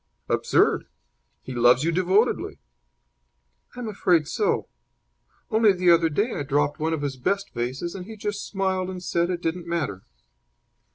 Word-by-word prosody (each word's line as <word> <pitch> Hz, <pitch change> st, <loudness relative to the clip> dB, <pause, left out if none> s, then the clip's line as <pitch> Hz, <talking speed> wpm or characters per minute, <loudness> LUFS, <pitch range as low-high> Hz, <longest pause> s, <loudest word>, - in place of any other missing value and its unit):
"Absurd! -, -, +2 dB, 0.6 s
He 130 Hz, -, -7 dB
loves 120 Hz, +2 st, +4 dB
you 165 Hz, -, +1 dB
devotedly." 185 Hz, +7 st, +1 dB, 1.2 s
"I'm 245 Hz, -2 st, -5 dB
afraid 180 Hz, -7 st, +2 dB
so. 420 Hz, -, 0 dB, 0.8 s
Only 220 Hz, -2 st, +5 dB
the 180 Hz, -1 st, +3 dB
other 165 Hz, -1 st, +4 dB
day 205 Hz, +10 st, 0 dB
I -, -, -3 dB
dropped 145 Hz, +1 st, 0 dB
one 160 Hz, +1 st, 0 dB
of 150 Hz, -2 st, -3 dB
his 135 Hz, -2 st, -3 dB
best 195 Hz, +10 st, -1 dB
vases, 130 Hz, +8 st, -3 dB
and 185 Hz, -1 st, -8 dB
he 220 Hz, -, -8 dB
just 205 Hz, 0 st, -4 dB
smiled 190 Hz, -2 st, -1 dB
and 180 Hz, -1 st, -6 dB
said 170 Hz, -1 st, 0 dB
it 175 Hz, -1 st, -3 dB
didn't 170 Hz, +1 st, -2 dB
matter." 160 Hz, -, -2 dB
175 Hz, 155 wpm, -25 LUFS, 145-195 Hz, 1.2 s, Only